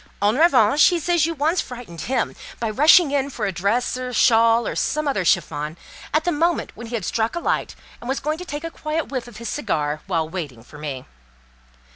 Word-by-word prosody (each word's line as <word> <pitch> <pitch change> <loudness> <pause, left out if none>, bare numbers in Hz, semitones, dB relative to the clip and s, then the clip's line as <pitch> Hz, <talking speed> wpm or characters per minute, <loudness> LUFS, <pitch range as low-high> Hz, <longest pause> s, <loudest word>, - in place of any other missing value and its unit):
En 205 +3 +2
revanche, 285 -4 +5
he 355 - +2
says 335 -1 +2
you 330 - -3
once 315 +5 +1
frightened 240 -10 -9
him 250 -2 -1 0.2
by 230 -2 -1
rushing 300 - +6
in 280 -1 0
for - - -3
a 195 - 0
dress 200 +9 0
or 255 - -4
a 250 - -6
shawl, 230 -1 +4
or - - -3
some 305 0 -1
other 235 -9 0
chiffon, 150 -1 0 0.3
at 310 +1 +2
the 350 - +1
moment 335 +2 0
when 235 +1 -9
he 235 - -4
had 210 -6 -3
struck 225 +4 -1
a - - -1
light, - - -1 0.2
and 240 - -8
was 270 - 0
going 305 +2 -2
to - - -6
take 295 -1 -6
a 330 - -5
quiet 310 0 -3
whiff 255 -3 -4
of 235 -4 -12
his 235 +1 -7
cigar, 150 - -2
while 165 -4 0
waiting 150 -9 -6
for 150 +4 -14
me. 140 -4 -5
245 Hz, 225 wpm, -22 LUFS, 195-305 Hz, 0.3 s, rushing